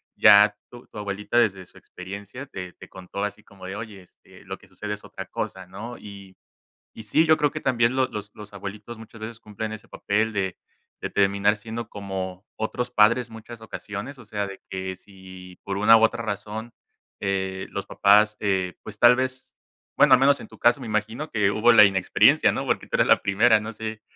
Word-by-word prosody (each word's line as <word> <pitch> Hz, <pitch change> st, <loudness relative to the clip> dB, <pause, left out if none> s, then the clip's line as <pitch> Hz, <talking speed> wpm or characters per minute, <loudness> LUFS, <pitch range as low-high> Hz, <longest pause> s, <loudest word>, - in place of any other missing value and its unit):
ya 105 Hz, 0 st, +7 dB, 0.2 s
tu 120 Hz, 0 st, -13 dB
tu -, -, -13 dB
abuelita 105 Hz, +2 st, -3 dB
desde 95 Hz, -6 st, +2 dB
su -, -, -19 dB
experiencia 100 Hz, +7 st, -9 dB
te 90 Hz, -6 st, -8 dB
te -, -, -14 dB
contó 95 Hz, +2 st, -7 dB
así 105 Hz, +1 st, -5 dB
como 95 Hz, -2 st, -13 dB
de: 95 Hz, -, -6 dB
"Oye, 105 Hz, -2 st, -8 dB
este, 90 Hz, -, -20 dB
lo -, -, -7 dB
que -, -, -21 dB
sucede 105 Hz, 0 st, -5 dB
es 105 Hz, -, -16 dB
otra 95 Hz, -1 st, -8 dB
cosa" 95 Hz, -2 st, -5 dB
¿no? 110 Hz, +6 st, -8 dB
Y 100 Hz, -2 st, -12 dB, 0.6 s
y 110 Hz, -, -8 dB
sí, 155 Hz, +10 st, +2 dB
yo 155 Hz, 0 st, +5 dB
creo 145 Hz, -1 st, +1 dB
que -, -, -6 dB
también 120 Hz, -1 st, +2 dB
lo 130 Hz, -1 st, +2 dB
los 105 Hz, 0 st, -7 dB
los 105 Hz, -1 st, -12 dB
abuelitos 100 Hz, +4 st, -8 dB
muchas 110 Hz, 0 st, -13 dB
veces 115 Hz, +1 st, -7 dB
cumplen 110 Hz, 0 st, -6 dB
ese 110 Hz, -1 st, -9 dB
papel 110 Hz, +2 st, -1 dB
de 95 Hz, -2 st, -2 dB, 0.4 s
de -, -, -4 dB
terminar 100 Hz, +1 st, +2 dB
siendo 110 Hz, +2 st, -7 dB
como 95 Hz, -1 st, -6 dB
otros 120 Hz, +3 st, -3 dB
padres 115 Hz, +2 st, +3 dB
muchas 110 Hz, +1 st, -11 dB
ocasiones, 110 Hz, +4 st, -7 dB
o 120 Hz, -, -14 dB
sea, 105 Hz, -1 st, -3 dB
de 95 Hz, -1 st, -10 dB
que 95 Hz, 0 st, -4 dB
si 95 Hz, -1 st, -14 dB
por 100 Hz, -, -4 dB
una, 105 Hz, +3 st, +7 dB
u -, -, +1 dB
otra 115 Hz, +1 st, +2 dB
razón, 105 Hz, +2 st, -5 dB, 0.5 s
eh, 95 Hz, -1 st, -2 dB
los 100 Hz, -, -5 dB
papás, 105 Hz, +2 st, +4 dB
eh, 95 Hz, -3 st, -1 dB
pues, 105 Hz, -1 st, -10 dB
tal 120 Hz, +2 st, +7 dB
vez 130 Hz, 0 st, -3 dB, 0.5 s
bueno, -, -, +6 dB
al 130 Hz, -, +7 dB
menos 140 Hz, +1 st, +4 dB
en -, -, -10 dB
tu -, -, -15 dB
caso, 120 Hz, 0 st, +3 dB
me -, -, -6 dB
imagino 110 Hz, +8 st, -3 dB
que 100 Hz, -2 st, +2 dB
hubo 115 Hz, +3 st, +4 dB
la 105 Hz, -3 st, +9 dB
inexperiencia, 95 Hz, -2 st, +4 dB
¿no? -, -, -3 dB
Porque -, -, -1 dB
tú -, -, -3 dB
eras -, -, +3 dB
la -, -, +5 dB
primera, 105 Hz, +2 st, +3 dB
no 110 Hz, -, -6 dB
sé 110 Hz, -1 st, -6 dB
105 Hz, 210 wpm, -24 LUFS, 100-115 Hz, 0.6 s, la